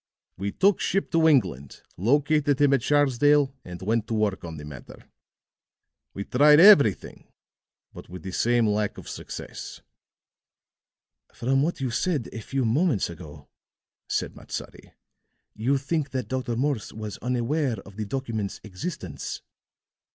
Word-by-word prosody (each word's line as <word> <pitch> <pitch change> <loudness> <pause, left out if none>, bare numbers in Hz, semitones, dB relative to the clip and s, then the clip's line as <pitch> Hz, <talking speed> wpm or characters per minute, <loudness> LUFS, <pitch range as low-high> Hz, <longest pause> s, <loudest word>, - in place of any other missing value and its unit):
"We 100 +2 -3
took 195 - +3
ship 195 - -1
to 165 -1 +4
England, 70 - +1
located 145 - +2
him 145 -1 +4
at 135 - +3
Sharsdale, 145 0 +3
and 90 -1 -9
went 110 +2 0
to 115 - -2
work 105 -3 0
on 80 -2 -7
the 75 - -8
matter. 70 -4 -11 1.1
We 100 - -3
tried 150 +7 +5
everything, 150 - +5 0.7
but - - -12
with 90 -2 -9
the 95 - -5
same 120 +4 +2
lack 105 -1 0
of - - -10
success." - - -8 1.5
"From 135 +3 +1
what 155 0 -1
you 130 -2 -1
said 145 0 -1
a 115 - -6
few 135 +3 -2
moments 125 - +1
ago," 80 -4 -12 0.6
said - - -2
Matsadi, - - -8 0.6
"you 125 +6 +1
think 145 +1 -2
that 130 -1 -3
Dr. 130 -3 -2
Morse 135 -2 -1
was 110 -2 -7
unaware 125 +1 -1
of 100 0 -15
the 110 0 -4
document's 110 -4 -4
existence." 95 - -6
120 Hz, 140 wpm, -25 LUFS, 105-145 Hz, 1.5 s, tried